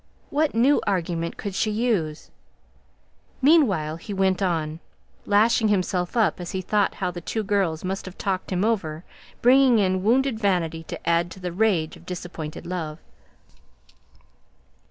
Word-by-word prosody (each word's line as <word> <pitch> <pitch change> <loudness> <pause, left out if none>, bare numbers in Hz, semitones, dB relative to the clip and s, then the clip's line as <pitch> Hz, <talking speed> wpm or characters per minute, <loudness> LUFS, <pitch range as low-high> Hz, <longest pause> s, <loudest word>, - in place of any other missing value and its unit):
What 300 -1 +1
new 265 +6 +4
argument 170 -3 -1
could 200 - -5
she 215 - 0
use? 210 -9 -1 1.1
Meanwhile 210 - +3
he 200 +4 -7
went 190 0 +1
on, 160 -4 -1 0.5
lashing 220 +2 +4
himself 185 -1 0
up 220 -3 +2
as 175 - -6
he 190 - -2
thought 205 +1 +1
how 185 -2 -2
the 175 0 -7
two 220 +5 -3
girls 195 -6 0
must 190 +1 -3
have 190 -1 -10
talked 190 -1 -2
him 185 +2 +1
over, 175 -8 -1 0.4
bringing 255 0 +6
in 185 -2 +1
wounded 250 +2 +2
vanity 175 -6 0
to - - -8
add 170 +1 +2
to 190 - -11
the 180 -1 -4
rage 180 -5 +1
of 170 +1 -19
disappointed 170 -4 -6
love. 165 -4 -4
190 Hz, 150 wpm, -24 LUFS, 170-215 Hz, 1.1 s, bringing